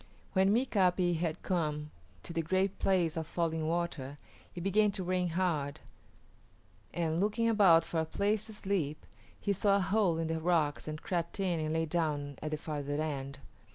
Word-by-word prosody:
When 190 0 +4
Mika´pi 185 -7 +2
had 160 -1 -2
come 150 -4 -1 0.3
to - - -7
the 165 - 0
Great 190 +4 0
Place 180 -4 +2
of 160 -2 -3
Falling 160 -2 -1
Water,[A] 160 -5 -2 0.4
it 175 - -5
began 205 +3 +3
to 190 - -2
rain 180 0 0
hard, 165 -5 -1 1.1
and, 165 -1 -1
looking 215 +4 +1
about 190 -7 +6
for 165 - -2
a 160 - +1
place 205 +6 0
to 220 - -8
sleep, 190 -8 -2 0.3
he 200 - 0
saw 200 +1 +3
a - - +3
hole 190 -3 +2
in 165 - -1
the 160 0 -1
rocks 155 -4 +1
and 155 0 -5
crept 170 0 -2
in 180 -4 +1
and 155 0 -1
lay 160 0 +1
down 150 -4 -2
at 155 - -3
the 155 - -2
farther 145 -2 -3
end. 140 -3 -3
170 Hz, 180 wpm, -32 LUFS, 155-190 Hz, 1.1 s, about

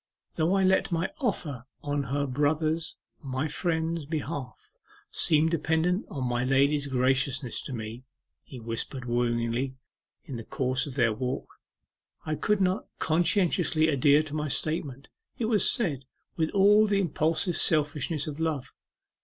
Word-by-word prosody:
'Though 165 +5 +1
I 195 - +3
let 190 0 +3
my 170 +2 0
offer 150 - -2 0.2
on 145 -1 -1
her 140 +3 -1
brother's 155 +4 0 0.2
my 135 +1 -2
friend's 160 -1 -1
behalf, 145 -4 -5 0.4
seem 155 0 +3
dependent 165 +4 0
on 130 -4 -3
my 120 0 0
lady's 140 +2 +2
graciousness 130 -1 +1
to 135 - -6
me,' 115 +1 -6 0.4
he 130 - -10
whispered 115 +3 -4
wooingly 120 +2 0 0.5
in 135 -7 -6
the 115 - -6
course 130 +4 -1
of 135 - -7
their 120 -5 +3
walk, 125 +3 -3 0.8
'I 155 - -1
could 205 +6 +1
not 185 +1 +1
conscientiously 165 -1 +2
adhere 145 +1 +4
to 150 -1 -9
my 150 0 -1
statement; 145 -2 -2 0.3
it 230 - -1
was 220 -4 +3
said 145 - 0 0.3
with 160 -1 0
all 205 +2 +5
the 200 -1 +2
impulsive 165 0 0
selfishness 150 -1 +1
of 150 0 -6
love. 155 -5 -2
150 Hz, 145 wpm, -28 LUFS, 130-165 Hz, 0.8 s, all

